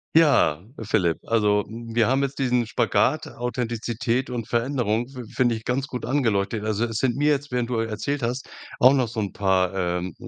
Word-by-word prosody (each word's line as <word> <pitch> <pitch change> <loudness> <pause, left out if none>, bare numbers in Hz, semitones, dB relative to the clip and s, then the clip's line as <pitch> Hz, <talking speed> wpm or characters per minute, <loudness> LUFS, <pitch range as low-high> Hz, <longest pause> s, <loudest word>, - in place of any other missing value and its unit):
Ja, 145 - +4 0.2
Philipp, 95 -6 +1
also, 105 -2 +2
wir 115 0 -1
haben 135 +2 +2
jetzt 140 0 -3
diesen 125 -3 +2
Spagat 120 +7 +1
Authentizität 120 0 -2
und 115 -2 -4
Veränderung 120 -2 0
fi 130 -3 -8
find 125 -2 +2
ich 110 -1 -3
ganz 130 +2 0
gut 125 -4 -6
angeleuchtet. 110 -5 0
Also 110 +2 0
es 115 -2 -4
sind 125 -1 0
mir 145 +1 +2
jetzt, 145 0 -1
während 125 -1 -1
du, 120 - 0
äh, 115 - -2
erzählt 125 +5 -3
hast, 125 +3 -2 0.3
auch 130 +2 +7
noch 130 -4 +2
so 115 -1 -5
'n 100 -4 -2
paar, 95 -2 +1
ähm 90 -1 -2
120 Hz, 195 wpm, -24 LUFS, 110-130 Hz, 0.3 s, auch